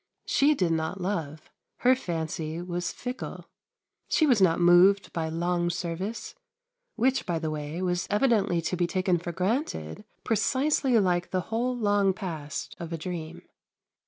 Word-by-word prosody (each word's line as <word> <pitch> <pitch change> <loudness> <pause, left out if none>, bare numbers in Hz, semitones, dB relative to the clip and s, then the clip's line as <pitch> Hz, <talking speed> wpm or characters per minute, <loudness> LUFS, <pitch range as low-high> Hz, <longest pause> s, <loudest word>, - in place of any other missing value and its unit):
She 295 +2 +3
did 180 -9 +1
not 160 +4 -1
love; 165 -5 -4 0.3
her 255 +1 +5
fancy 160 -5 -4
was 175 0 -3
fickle; 250 +1 -6 0.6
she 315 - +3
was 250 -8 +3
not 175 -3 +4
moved 180 +3 +5
by 160 -2 -2
long 175 +1 0
service, 175 +5 -4 0.6
which, 260 +2 +1
by 175 -2 0
the 160 -1 -2
way, 155 +4 -4
was 180 -1 -1
evidently 205 -6 +2
to 170 - -1
be 175 -1 +1
taken 185 -1 +1
for 175 +1 -5
granted 210 - -2 0.2
precisely 260 +2 +2
like 180 -3 +1
the 185 - 0
whole 245 +2 0
long 205 -3 +2
past 160 -7 -5
of 170 -1 -6
a 165 - -2
dream. 160 -1 -6
180 Hz, 150 wpm, -27 LUFS, 165-210 Hz, 0.6 s, her